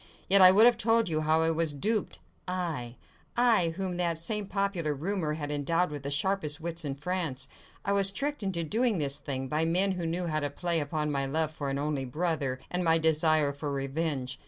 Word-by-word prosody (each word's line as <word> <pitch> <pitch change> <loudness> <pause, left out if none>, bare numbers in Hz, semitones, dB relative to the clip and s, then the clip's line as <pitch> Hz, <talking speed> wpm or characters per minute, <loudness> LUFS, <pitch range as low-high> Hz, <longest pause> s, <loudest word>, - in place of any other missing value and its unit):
Yet 195 +1 +7
I 185 - +10
would 210 +4 +6
have 240 -2 +5
told 225 -2 +2
you 155 -1 0
how 155 +1 +2
I 165 - +2
was 160 -2 0
duped! 210 +9 -1 0.3
Aye! 165 -10 -3 0.4
I, 230 -8 +3
whom 185 -2 -3
that 170 -2 -1
same 205 +5 -3
popular 190 -7 -1
rumour 165 +1 -2
had 145 -2 -5
endowed 165 +4 0
with 145 -1 -6
the 140 - -5
sharpest 155 0 -1
wits 170 0 -3
in 140 -2 -3
France! 145 -4 -3 0.4
I 200 - 0
was 200 -1 +4
tricked 285 +7 -2
into 190 -4 -2
doing 225 +5 +1
this 140 -3 -1
thing, 135 -1 -4
by 150 +4 0
men 180 +4 +2
who 175 -3 -3
knew 175 +2 -1
how 155 -2 0
to 145 -1 -2
play 170 +3 0
upon 150 0 -2
my 140 -1 -1
love 155 +2 0
for 145 -3 -5
an 135 - -2
only 145 -2 -2
brother, 145 -2 -2
and 180 0 0
my 165 -1 +4
desire 155 -2 +3
for 145 +1 -5
revenge. 135 -1 -3
160 Hz, 210 wpm, -29 LUFS, 145-185 Hz, 0.4 s, I